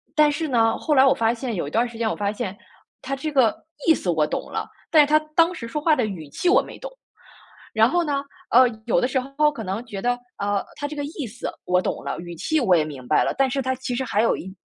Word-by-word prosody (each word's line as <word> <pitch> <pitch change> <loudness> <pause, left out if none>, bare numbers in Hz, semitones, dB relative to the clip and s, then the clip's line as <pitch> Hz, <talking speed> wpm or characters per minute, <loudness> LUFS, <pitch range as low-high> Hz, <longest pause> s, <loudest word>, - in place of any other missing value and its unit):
但 300 -1 +5
是 315 +2 -2
呢， 225 -4 +2
后 310 - 0
来 265 - +7
我 270 - +5
发 225 0 +2
现 245 0 -4
有 170 - -2
一 - - -7
段 230 - +2
儿 - - -3
时 235 -1 -11
间 225 -1 0
我 - - -2
发 205 -1 -1
现， 200 -2 -4 0.5
他 275 - -3
这 305 +3 -4
个 255 -7 +3 0.3
意 325 - +8
思 180 - -4
我 160 -3 +2
懂 - - -4
了， - - -3 0.2
但 315 - +7
是 - - +5
他 305 +1 +5 0.2
当 335 +1 +4
时 245 -9 -7
说 265 +6 -3
话 310 0 +4
的 250 - +1
语 180 -8 -6
气 350 - 0
我 385 - +6
没 - - -10
懂。 - - -7 0.8
然 220 0 +5
后 350 +5 +2
呢， 285 -3 -1 0.3
呃， 250 +2 +7 0.2
有 235 - +2
的 - - +2
时 265 0 0
候 275 +4 +1
可 230 - -7
能 200 +5 -4
觉 205 -5 -6
得， 245 +2 +1 0.2
呃， 200 0 -1
他 290 - -4
这 300 - -7
个 290 - -3
意 290 -3 -5
思 230 +3 -6 0.2
我 180 0 +3
懂 - - -3
了， - - -3
语 175 0 -7
气 315 - 0
我 195 -9 +4
也 160 - +3
明 135 -5 -9
白 - - +3
了， - - 0
但 270 0 +3
是 275 +1 -1
他 260 0 -1
其 255 0 -4
实 260 - -1
还 220 -3 +1
有 230 - +3
一 190 - -8
245 Hz, 305 characters per minute, -23 LUFS, 205-290 Hz, 0.8 s, 意